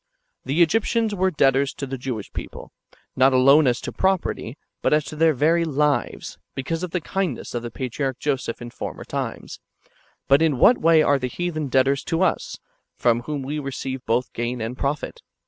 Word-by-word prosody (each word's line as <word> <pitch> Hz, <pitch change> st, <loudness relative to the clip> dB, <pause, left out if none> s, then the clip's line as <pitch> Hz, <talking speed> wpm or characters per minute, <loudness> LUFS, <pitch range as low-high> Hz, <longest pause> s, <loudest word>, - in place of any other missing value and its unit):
The 145 Hz, +7 st, +3 dB
Egyptians 225 Hz, +5 st, +1 dB
were 190 Hz, -1 st, +2 dB
debtors 140 Hz, -3 st, +2 dB
to 140 Hz, -, -4 dB
the 135 Hz, 0 st, -5 dB
[Jewish] 125 Hz, -5 st, -5 dB
people, -, -, -8 dB, 0.4 s
not 130 Hz, +1 st, +4 dB
alone 135 Hz, +3 st, +6 dB
as 120 Hz, -, +2 dB
to -, -, -5 dB
propert}^, 190 Hz, -, -1 dB, 0.3 s
but -, -, +2 dB
as 150 Hz, -1 st, 0 dB
to 145 Hz, -, -7 dB
their 160 Hz, 0 st, +3 dB
very 165 Hz, +5 st, +3 dB
lives, 150 Hz, -2 st, -1 dB, 0.2 s
because 160 Hz, +5 st, -3 dB
of 180 Hz, -, -3 dB
the 180 Hz, -, -1 dB
kindness 180 Hz, -4 st, -3 dB
of 120 Hz, -, -2 dB
the 120 Hz, -, -5 dB
patriarch 130 Hz, +2 st, -3 dB
Joseph 130 Hz, -5 st, -2 dB
in 120 Hz, -, -8 dB
former -, -, -6 dB
times; -, -, -5 dB, 0.7 s
but 140 Hz, +2 st, +5 dB
in 155 Hz, -5 st, +2 dB
what 240 Hz, -, +5 dB
way 160 Hz, -1 st, +5 dB
are 145 Hz, -2 st, +3 dB
the 130 Hz, -, -2 dB
heathen 155 Hz, +1 st, -3 dB
debtors 135 Hz, +1 st, +2 dB
to 165 Hz, +3 st, 0 dB
us, 185 Hz, -, -1 dB, 0.4 s
from 120 Hz, -1 st, +2 dB
whom 140 Hz, +3 st, -4 dB
we 145 Hz, +3 st, -3 dB
receive 135 Hz, -2 st, -5 dB
both 120 Hz, +2 st, 0 dB
gain 120 Hz, +1 st, -3 dB
and 115 Hz, +2 st, -4 dB
profit 140 Hz, +3 st, -3 dB
140 Hz, 185 wpm, -23 LUFS, 130-160 Hz, 0.7 s, alone